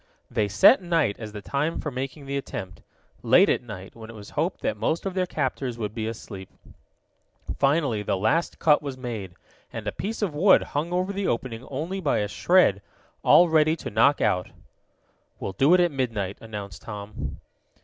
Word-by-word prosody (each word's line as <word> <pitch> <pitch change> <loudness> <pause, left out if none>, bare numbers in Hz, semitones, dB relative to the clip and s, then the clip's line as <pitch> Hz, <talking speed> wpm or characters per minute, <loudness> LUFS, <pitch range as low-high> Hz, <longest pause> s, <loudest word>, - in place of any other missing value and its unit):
They 110 -4 +1
set 100 - +6
night 165 - +1
as 110 -2 -7
the 105 -1 -8
time 145 +7 -1
for 150 - -4
making 135 +3 -5
the 140 0 -4
attempt 95 -8 -6 0.4
late - - +5
at - - +2
night, 100 -6 -10
when 110 -1 -11
it 115 - -10
was 105 -1 -11
hoped - - -2
that - - -1
most 165 - -1
of 195 - -2
their 185 -1 0
captors 125 -7 -2
would 105 -2 -4
be 110 -1 -3
asleep. 100 -4 -8 1.1
Finally 140 -6 +2
the 100 - -1
last 130 - 0
cut 150 -3 +4
was 140 -3 -6
made, 110 -8 -6 0.4
and - - -6
a - - -1
piece 215 +3 -4
of 185 -7 -1
wood 185 +6 +5
hung 155 +4 -3
over 185 +2 -1
the 200 0 -2
opening 115 0 -2
only 160 +8 -3
by 150 -7 +1
a 105 - 0
shred, 105 - +3 0.4
all 175 - +6
ready 155 -1 +3
to - - -7
knock 115 +7 +3
out. 90 -4 +1 0.9
"We'll 95 - -4
do 135 - +3
it - - +3
at 175 -1 +3
midnight," 115 -8 -2
announced 105 -3 -8
Tom. 105 -1 -7
130 Hz, 190 wpm, -25 LUFS, 105-160 Hz, 1.1 s, set